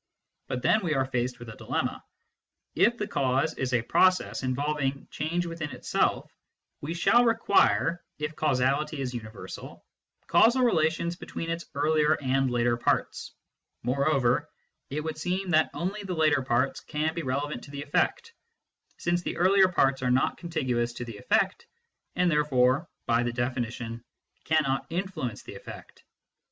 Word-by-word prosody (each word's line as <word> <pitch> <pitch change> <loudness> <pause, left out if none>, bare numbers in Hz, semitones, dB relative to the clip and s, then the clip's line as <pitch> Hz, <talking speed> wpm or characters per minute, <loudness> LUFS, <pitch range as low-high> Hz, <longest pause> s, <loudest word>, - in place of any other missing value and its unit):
But 125 -2 -4
then 215 - +4
we 160 -4 0
are 135 0 +2
faced 125 -1 -2
with 120 -1 -10
a 110 - -9
dilemma: - - -3 0.7
if - - +3
the - - -3
cause 135 +4 +1
is 130 -1 -3
a 125 -2 +2
process 185 +9 +2
involving 140 +1 -1
change 170 +3 -1
within 165 -3 -4
itself, - - -1 0.5
we 160 +4 -4
shall 240 +8 +4
require 200 -6 +3
(if 150 +1 -4
causality 140 +1 +1
is 130 -2 -3
uni 110 -3 -6
versal) 110 - -10 0.4
causal 245 +3 +4
relations 170 -4 +1
between 165 -2 -5
its 170 0 -4
earlier 155 +1 +3
and 135 -1 +1
later 120 -1 +1
parts; 120 - -1 0.5
moreover, 135 0 +1 0.4
it 150 +3 -2
would 155 -1 -4
seem 180 +3 -2
that 155 -1 +4
only 195 +4 -3
the 190 -3 -4
later 155 -3 +3
parts 130 +1 0
can 155 +1 -2
be 170 - -3
relevant 145 +1 -3
to - - -14
the 140 0 -6
effect, 305 - 0 0.6
since 175 0 0
the - - -4
earlier 190 +2 +5
parts 135 -7 +2
are 125 - 0
not 125 +1 +2
contiguous 130 -9 -2
to 120 - -6
the 115 -3 -8
effect, - - 0 0.5
and 180 -1 +2
therefore 145 0 +2 0.2
(by 115 0 +2
the 120 0 -1
definition) 120 -1 -3 0.4
cannot 150 -4 +1
influence 165 - -4
the - - -9
effect. - - -11
145 Hz, 155 wpm, -27 LUFS, 125-170 Hz, 0.7 s, earlier